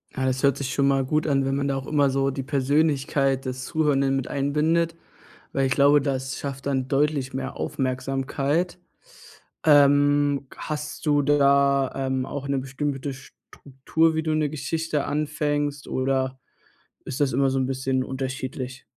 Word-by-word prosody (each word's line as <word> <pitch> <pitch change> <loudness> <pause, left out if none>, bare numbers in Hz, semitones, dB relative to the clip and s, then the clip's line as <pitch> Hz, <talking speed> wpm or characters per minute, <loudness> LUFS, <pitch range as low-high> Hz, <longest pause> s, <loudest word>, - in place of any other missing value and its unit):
Ja, 130 - -1
das 130 0 0
hört 140 -1 +3
sich 130 -2 -3
schon 140 -1 +2
mal 135 -1 +2
gut 155 +3 0
an, 135 -2 +2
wenn 135 0 0
man 140 0 -1
da 135 - 0
auch 135 0 -4
immer 145 -2 +3
so 135 +1 +1
die 135 0 -4
Persönlichkeit 140 -1 +1
des 130 0 -4
Zuhörenden 140 -4 +1
mit 135 - -2
einbindet, 155 +4 +1 0.6
weil 135 -1 +1
ich 135 - +1
glaube, 145 +1 +5
das 135 -1 -2
schafft 135 -1 -6
dann 130 -2 -1
deutlich 140 -2 0
mehr 135 - -4
Aufmerksamkeit. 135 +6 -1 0.9
Ähm, 145 -1 +4
hast 150 +1 -5
du 145 -1 +3
da, 140 -1 +3
ähm, 130 -1 -1
auch 140 0 -5
'ne 140 -1 0
bestimmte 135 +1 -3
Struktur, 140 +4 -2
wie 160 - 0
du 155 - -1
'ne 155 -2 +1
Geschichte 155 +1 -2
anfängst 145 -1 -2
oder 130 0 -1 0.7
ist 135 +1 -6
das 140 -3 +2
immer 135 +1 +2
so 135 - 0
'n 130 - 0
bisschen 130 0 -1
unterschiedlich? 130 -1 -5
140 Hz, 160 wpm, -24 LUFS, 135-145 Hz, 0.9 s, glaube